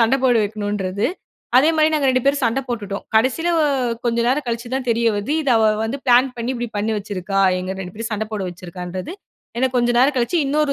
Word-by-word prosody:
சண்ட 230 +3 +4
போட 245 -2 +4
வைக்கணுன்றது. 205 -2 -2 0.5
அதே 275 +5 +6
மாரி 310 0 +4
நாங்க 290 -3 +1
2 255 -1 +1
பேரும் 280 0 +2
சண்ட 230 +4 +1
போட்டுட்டோம். 205 -4 -4
கடைசில 260 +10 +2
வ 320 - +3 0.4
கொஞ்சம் 235 0 +1
நேரம் 270 +3 +1
கழிச்சு 235 +1 -3
தான் 260 -1 -2
தெரிய 230 0 +1
வருது, 205 +8 -2
இத 280 - -2
அவ 220 - +3 0.2
வந்து 260 +5 -3
ப்ளான் 250 +2 +5
பண்ணி 235 +1 -3
இப்டி 240 -1 -4
பண்ணி 210 +2 0
வச்சிருக்கா, 195 -1 -4 0.2
எங்க 185 +1 -4
2 180 0 -7
பேரும் 225 +1 -5
சண்ட 215 +1 -1
போட 210 - -3
வச்சுருக்கான்றது, 180 - -7 0.5
ஏனா 260 - +2
கொஞ்சம் 240 0 +2
நேரம் 270 +2 +3
கழிச்சு 250 +8 +1
இன்னொரு 295 0 +1
235 Hz, 205 wpm, -20 LUFS, 205-260 Hz, 0.5 s, அதே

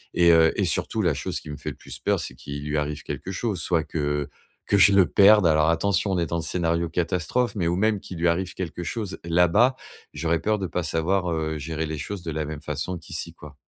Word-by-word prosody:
et 85 -1 +6
heu, 80 -1 +5
et - - +2
surtout - - -1
la - - +2
chose - - -3
qui 75 - -9
me - - -5
fait - - -5
le - - -11
plus - - -9
peur, - - +1
c'est - - -5
qu'il 70 +3 -7
lui 75 +1 -1
arrive 75 0 -3
quelque 95 - -5
chose. 95 -2 -2
Soit 85 -2 +1
que 75 -2 -2 0.4
que 100 - +2
je 100 +1 +7
le 100 -2 +6
perde- 105 +3 +6
alors 80 0 +3
attention, 95 +4 +1
on - - 0
est 85 - +1
dans 85 +2 -2
le - - -2
scénario 85 0 -1
catastrophe- 90 +8 0
mais 90 -5 0
ou 85 - +1
même, 105 +2 +1
qu'il 90 - -9
lui 85 +1 +1
arrive 90 +2 0
quelque 90 -2 -5
chose 105 +1 -4
là-bas, 90 +9 +3 0.4
j'aurais 80 +2 0
peur 110 +4 0
de 95 - -2
pas 90 +2 -2
savoir, 85 +3 0
heu, 80 -1 -2
gérer 80 +2 -3
les 80 -1 -5
choses 95 +5 -5
de 85 - -4
la 80 0 -2
même 75 0 -6
façon 75 +5 -3
qu'ici, 85 0 -7
quoi. 75 -3 -12
85 Hz, 245 wpm, -24 LUFS, 80-95 Hz, 0.4 s, je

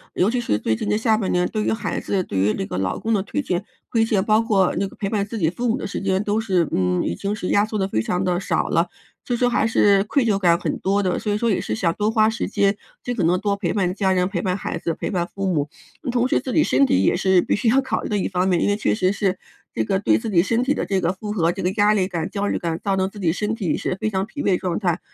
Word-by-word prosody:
尤 190 - +2
其 245 0 0
是 105 - 0
最 110 - 0
近 - - -4
的 210 - +2
下 220 -1 +2
半 200 -4 -1
年， 180 0 +2
对 215 -1 -2
于 - - 0
孩 215 -2 -2
子、 195 - -1
对 100 - -5
于 100 +3 +2
这 - - -3
个 90 - -5
老 95 -1 -1
公 225 - -1
的 195 -3 +1
推 290 - -2
卸 180 -6 -2 0.3
推 225 -1 +2
卸， 215 -4 +1
包 215 +3 +3
括 200 -5 +2
那 200 - +1
个 - - -8
陪 200 - -2
伴 200 -1 0
自 225 +2 -6
己 160 -5 +2
父 240 +7 -2
母 225 - +1
的 215 - -4
时 - - -5
间 190 -1 +1
都 210 +1 -1
是， 185 -7 +1
嗯， 90 -1 +1
已 85 - -2
经 200 - -3
是 200 -3 -4
压 205 +1 +3
缩 215 -1 -4
的 190 - +1
非 110 - 0
常 180 +10 -1
地 180 -1 +1
少 195 - -1
了， - - +1 0.3
所 245 - -3
以 240 - +1
说 245 0 +2
还 235 - +1
是 200 -3 +4
愧 265 +4 +1
疚 210 -4 +2
感 170 -3 +3
很 - - -2
多 200 +2 +1
的， 185 -3 0
所 210 - -2
以 205 - 0
说 235 +1 0
也 200 - +1
是 110 - -3
想 165 +9 0
多 210 +1 0
花 215 0 +4
时 225 - -2
间， 200 -1 +2 0.3
尽 245 - -3
可 195 - -1
能 175 +2 +2
多 200 -1 0
陪 195 -4 -2
伴 185 -3 0
家 195 -2 +1
人、 180 -1 +2
陪 190 -3 -3
伴 185 -1 -1
孩 195 - -4
子、 165 0 -2
陪 - - -4
伴 175 -3 -1
父 195 -1 -2
母。 150 -5 0 0.4
同 245 0 +1
时 260 - +1
自 260 - -4
己 310 - +3
身 135 +2 +3
体 95 -5 +2
也 - - +3
是 190 0 +3
必 - - 0
须 230 +2 +1
要 265 +4 +4
考 265 - -2
虑 - - -5
的 210 - 0
一 - - 0
方 180 -1 0
面， 175 -2 +2
因 - - +2
为 205 - +2
确 215 - +1
实 185 -3 +1
是， 195 -2 0 0.4
这 110 - 0
个 190 - 0
对 - - +3
自 225 0 -4
己 170 -4 +4
身 230 +6 +1
体 275 +3 +1
的 - - -2
这 195 -2 0
个 175 +1 +1
负 210 +2 -6
荷， 170 -5 +1
这 - - -6
个 180 - +1
压 210 +1 +5
力 190 -3 +1
感、 170 -3 -3
焦 205 -1 -2
虑 - - 0
感， 165 -1 -3
造 195 -1 +1
成 190 0 0
自 205 - -12
己 170 -4 +1
身 210 +4 -2
体 185 -9 -1
是 - - -2
非 215 - +1
常 190 -2 -1
疲 290 +7 -7
惫 185 -2 +2
状 180 -2 -2
态， 180 -3 0
195 Hz, 340 characters per minute, -22 LUFS, 180-215 Hz, 0.4 s, 压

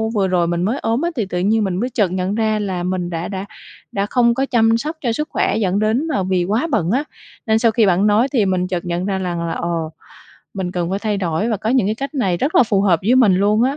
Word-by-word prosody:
vừa 195 -2 +2
rồi 175 -2 +1
mình 175 0 -1
mới 225 +8 -1
ốm 230 +4 -1
á 340 - 0
thì 225 -6 -1
tự 180 -2 -3
nhiên 215 +4 +2
mình 190 -3 -1
mới 245 +4 -1
chợt 210 -7 0
nhận 185 +2 -2
ra 215 -1 0
là 185 -4 -3
mình 180 -1 -2
đã 165 0 -4
đã 195 -1 -5 0.5
đã 200 0 -1
không 235 +1 +2
có 270 +3 0
chăm 225 -3 +3
sóc 310 +6 -4
cho 240 -4 0
sức 300 +6 -3
khỏe - - 0
dẫn 195 -2 0
đến 225 +9 +1
mà 235 -11 -1
vì 185 -1 0
quá 220 - 0
bận 185 -7 +1
á. 265 +6 +1 0.4
Nên 220 0 +3
sau 230 -1 +3
khi 225 -1 +3
bạn 190 +2 +3
nói 215 +5 +3
thì 220 -6 +3
mình 185 -1 0
chợt 180 -1 -3
nhận 175 +1 -2
ra 195 -1 -1
rằng 170 -2 -3
là, - - -2
ồ, 165 -2 -3 0.6
mình 185 -2 -3
cần 175 -1 -2
phải 195 - -1
thay 210 -1 -1
đổi 185 +3 -1
và 220 - 0
có 215 +3 -2
những 255 -7 +2
cái 215 - 0
cách 275 +5 -6
này 195 -10 0
rất 275 - -2
là - - +7
phù 205 -4 +1
hợp 175 -5 +3
với 225 +6 +3
mình 230 -8 +5
luôn 210 +3 +2
á, 270 +3 +1
205 Hz, 285 wpm, -19 LUFS, 180-230 Hz, 0.6 s, là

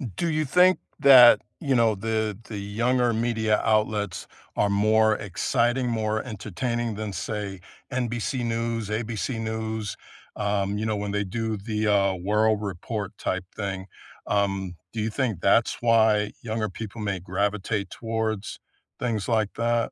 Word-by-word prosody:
Do 170 - -1
you 155 -1 0
think 180 +6 +5 0.2
that, 130 -3 +9 0.2
you 140 -3 0
know, 115 -3 +4
the 110 0 -1
the 110 - -5
younger 120 +5 +1
media 110 -1 +1
outlets 105 -3 0 0.3
are 105 - +2
more 110 +2 +3
exciting, 120 +6 0
more 110 -2 -1
entertaining 120 +1 -3
than, 105 -1 -4
say, 100 0 -4 0.3
NBC 125 0 -2
News, 115 -2 -2
ABC 115 +2 -2
News, 110 -1 -3 0.4
um, 100 -1 0
you 110 - -2
know, 110 -1 0
when 105 0 -3
they 105 0 0
do 110 +3 -3
the, 105 +1 -2
uh, 100 -2 +3
world 105 +3 +1
report 100 +1 -4
type 95 - -2
thing? 95 -2 -4 0.4
Um, 95 -3 0 0.2
do 110 - -2
you 110 - 0
think 110 - -2
that's 110 +4 +3
why 110 -3 +4
younger 110 -1 -2
people 110 +3 -7
may 100 -3 -2
gravitate 100 +3 -1
towards 110 -2 -3 0.4
things 115 -5 -1
like 110 -3 +1
that? 115 0 0
110 Hz, 145 wpm, -25 LUFS, 100-115 Hz, 0.4 s, that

